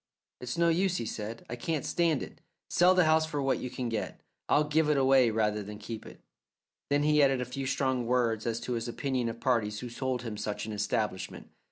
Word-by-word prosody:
"It's 125 +6 -5
no 170 0 +4
use," 180 +2 +2
he 115 - -3
said, 110 +1 -6
"I 120 - -4
can't 150 +4 -2
stand 165 -5 +1
it. - - -11 0.3
Sell 180 +1 +5
the 180 - +5
house 160 0 +3
for 150 -2 -3
what 135 -1 +1
you 125 - -4
can 125 0 -4
get. 115 -2 -3 0.3
I'll 150 - +4
give 150 +1 +2
it 150 - +3
away 135 -2 +5
rather 105 -1 0
than 105 +1 -8
keep 110 +1 -7
it." - - -13 0.7
Then 145 +1 +2
he 150 0 +4
added 135 -2 +4
a 125 - -1
few 135 +2 -4
strong 130 -3 0
words 120 -3 +1
as 115 0 -1
to 125 - -3
his 115 0 -2
opinion 125 0 -1
of 115 - -7
parties 110 -5 0
who 125 - -5
sold 125 0 -2
him 110 -3 -5
such 105 0 -3
an 110 - -5
establishment. 105 -1 -2
125 Hz, 225 wpm, -30 LUFS, 115-145 Hz, 0.7 s, Sell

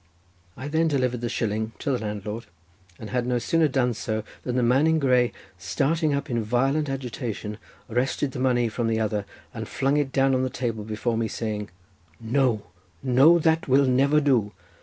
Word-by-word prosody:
I 130 - -6
then 160 +2 +2
delivered 125 -5 0
the 120 - -2
shilling 110 -1 -2
to 145 - -2
the 125 - 0
landlord, 105 +1 -5 0.5
but 110 - -8
had 125 -1 -1
no 125 -1 +1
sooner 160 +7 +2
done 130 -3 +1
so 110 -1 -3 0.2
than 125 - -3
the 125 - +2
man 130 +6 +4
in 160 0 +3
grey, 125 -4 +3 0.3
starting 150 - 0
up 140 0 -1
in 120 -2 -1
violent 135 +7 +1
agitation, 120 -5 -4 0.3
wrested 130 +4 -1
the 125 - -6
money 125 -2 +2
from 115 +1 -2
the 110 0 +1
other, 105 -2 -1 0.3
and - - -5
flung 135 +2 0
it 145 -2 0
down 135 0 +3
on 130 - +2
the 130 - 0
table 115 -4 -3
before 110 +2 -2
me 115 -1 0
saying:— 105 -2 -4 0.5
"No, 115 -2 +1 0.4
no, 135 +6 +6
that 160 0 +1
will 135 +1 +4
never 135 +4 +3
do. 125 -8 +2
125 Hz, 185 wpm, -25 LUFS, 110-135 Hz, 0.5 s, no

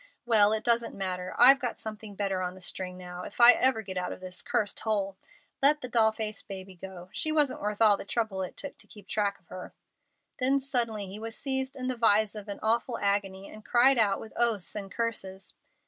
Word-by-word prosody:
Well, 215 -3 +5
it 220 0 0
doesn't 235 -1 +1
matter. 185 -2 -4
I've 265 +3 +8
got 245 -4 -3
something 215 -1 -8
better 195 -2 -1
on 180 0 -3
the - - -12
string 180 0 -4
now, 180 -1 -8
if - - -10
I 240 0 +10
ever 250 -3 +2
get 190 -2 -6
out 180 - -2
of - - -7
this 185 0 -4
cursed 205 -2 -1
hole. 200 -3 -1 0.5
Let 295 +2 +5
the 250 - -4
doll 225 -2 +3
faced 215 -1 -4
baby 190 -1 -8
go. 185 0 -10
She 310 - -1
wasn't 300 -4 +1
worth 210 +2 0
all 210 -2 +6
the - - -7
trouble 200 -2 -2
it 185 - -6
took 285 - -8
to - - -14
keep 205 -2 -15
track 205 -1 -1
of - - -36
her." - - -9 0.6
Then 270 +2 +3
suddenly 235 -6 -1
he 195 +2 -8
was 225 0 -6
seized 265 0 -2
in 255 -2 -4
the 255 - -1
vise 215 -2 +3
of 210 -1 -8
an 200 - -5
awful 230 +2 +1
agony, 200 -1 -1
and 215 0 -12
cried 245 +3 +4
out 200 -3 +3
with 220 - -10
oaths 230 -6 0
and 200 -2 -5
curses. 195 -3 -4
215 Hz, 225 wpm, -28 LUFS, 195-235 Hz, 0.6 s, I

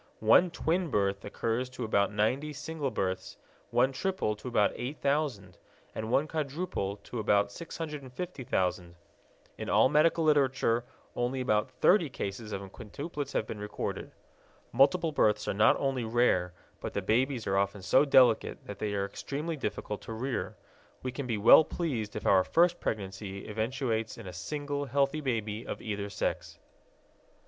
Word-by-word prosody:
One 115 +12 +5
twin 170 +1 -1
birth 100 -4 0
occurs 115 +3 -2
to 125 -1 -6
about 100 -3 +2
90 130 +9 0
single 150 -1 -3
births, 95 -5 -3 0.3
one 130 +2 +3
triple 160 - -1
to 115 - -9
about 105 -4 +3
8000, 135 - -2 0.3
and 110 0 -4
one 140 +5 +2
quadruple 150 - -3
to 120 - -6
about 100 -1 +2
650,000. 130 - -4 0.6
In - - -4
all - - +5
medical 155 +3 +3
literature 135 -6 +2 0.3
only 125 +2 -1
about 105 -2 +1
30 160 +6 +3
cases 105 -2 -5
of 100 -1 -3
quintuplets 145 - -6
have - - 0
been 110 - -6
recorded. 105 0 -4 0.6
Multiple 155 +7 +3
births 105 -7 +2
are - - 0
not 105 +2 +4
only 135 -3 -1
rare, 110 -6 +2 0.3
but - - -5
the 100 - -1
babies 120 +3 +1
are 95 - 0
often 100 0 -1
so 130 +8 +5
delicate 130 -5 +4
that 100 - -8
they 105 -1 -2
are 100 0 0
extremely 145 +10 -4
difficult 105 -5 -4
to 115 - -7
rear. 125 +3 -3 0.5
We 130 - -2
can 135 0 -5
be 115 -3 -1
well 110 +9 +8
pleased 130 -12 -3
if 105 - -5
our 95 -1 +5
first 175 - +3
pregnancy 100 -1 -4
eventuates 110 +1 -2
in - - -9
a 90 - -7
single 145 - -3
healthy 140 +3 +1
baby 110 -5 -2
of - - -5
either 100 -2 -4
sex. 100 - -3
120 Hz, 155 wpm, -30 LUFS, 105-145 Hz, 0.6 s, well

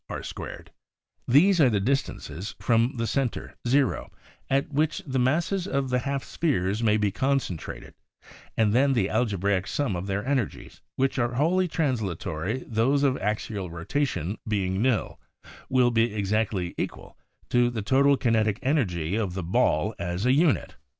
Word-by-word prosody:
Y% - - -4
r)2 - - -8
+ - - -8
83/320 - - -7
r2 - - -20 0.6
These 165 +8 +5
are 135 - +6
the 105 -3 +1
distances 100 - -2
from 115 +1 +1
center 130 0 -2
0, 135 0 +1 0.4
at 140 +2 0
which 155 +2 0
the 130 -2 -1
masses 170 +9 +1
of 135 -7 -1
the 125 - +2
half 135 +1 -2
spheres 105 - -1
may 110 -2 +3
be 105 -2 +1
con 135 +6 +1
centrated 90 -11 -6 0.7
and 110 -2 +3
then 135 +3 +4
the 100 -6 +1
algebraic 100 -4 0
sum 140 -10 -1
of 90 +2 -4
their 100 +2 -2
energies 130 -5 -2
— - - -61
which 135 0 0
are 120 0 0
wholly 180 +7 +2
translatory 110 - -2
those 130 +6 +2
of 135 -2 +3
axial 105 -2 -2
rotation 95 - -2
being 95 -2 0
nil 125 -2 0 0.3
— - - -15
will 125 -1 +3
be 115 0 +2
exact 105 +2 0
ly 90 -4 -3
equal - - -5 0.4
to 120 0 +4
the 115 -4 -4
total 140 +5 +4
kinetic 110 -4 +1
en 140 +5 +2
ergy 90 - -1
of 95 -4 -3
the 95 - -3
ball 85 - +1
as 90 +4 -2
a 125 - +4
unit. 155 0 +2
120 Hz, 175 wpm, -26 LUFS, 100-135 Hz, 0.7 s, are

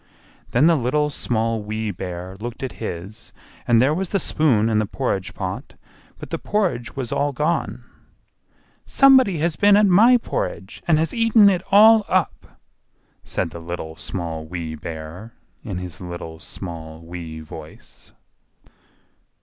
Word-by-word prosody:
Then 125 +5 +3
the 170 0 +5
Little, 150 +3 0
Small, 115 -4 -1
Wee 110 +1 -3
Bear 90 0 -6
looked 120 +3 -6
at 130 - -3
his, 105 +3 -7 0.4
and 120 -2 +5
there 135 +5 +4
was 185 +2 -2
the 200 - +1
spoon 140 - +2
in 110 -1 +2
the 105 - 0
porridge 100 -6 -3
pot, - - -5 0.4
but - - -10
the - - -2
porridge 180 - -1
was 130 -4 -4
all 145 0 0
gone. 150 +5 -1 1.0
"SOMEBODY 260 -9 +5
HAS 160 +1 -1
BEEN 205 0 +6
AT 210 - +5
MY 220 +7 +6
PORRIDGE, - - -4
AND 160 -3 +4
HAS 160 +1 0
EATEN 225 -3 +5
IT 180 -2 0
ALL 215 +2 +7
UP!" 185 -2 +2 0.9
said 85 - -3
the 85 - -8
Little, 80 -1 -6
Small, 80 -3 -5
Wee 80 -1 -5
Bear, 80 +7 -8 0.3
in 100 -7 -5
his 90 -1 -7
little, 85 -2 -7
small, 80 -3 -8
wee 85 -1 -8
voice. 80 0 -12
115 Hz, 150 wpm, -22 LUFS, -, 1.0 s, ALL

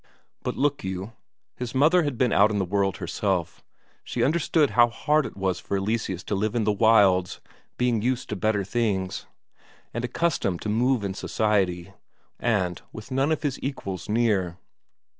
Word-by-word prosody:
For - - -2
look 145 0 0
you, 95 +3 -5 0.4
his 125 0 -6
mother 160 +7 +5
had 145 -6 -2
been 125 -1 +2
out 105 +2 +5
in 105 - -1
the 95 - 0
world 95 -1 0
herself; 90 0 -2 0.4
she - - -2
understood 155 -1 +2
how 120 -1 +5
hard 150 +5 +1
it - - -12
was 95 -2 -1
for 100 - -2
Eleseus 95 -2 -2
to - - -4
live 105 +3 -1
in 115 - +1
the 105 - +2
wilds, 100 -4 +4 0.4
being 120 -3 +1
used 125 +2 -1
to 105 - -2
better 105 0 0
things, 95 -3 -2 0.7
and 120 - -3
accustomed 120 - 0
to 105 - -2
move 120 +2 +2
in 100 -1 -2
society, 95 -4 0 0.5
and 95 -7 0
with 110 +4 -10
none 135 +4 +1
of 155 - -1
his 140 -3 -1
equals 100 - -5
near. 105 -6 +1
110 Hz, 170 wpm, -25 LUFS, 95-125 Hz, 0.7 s, mother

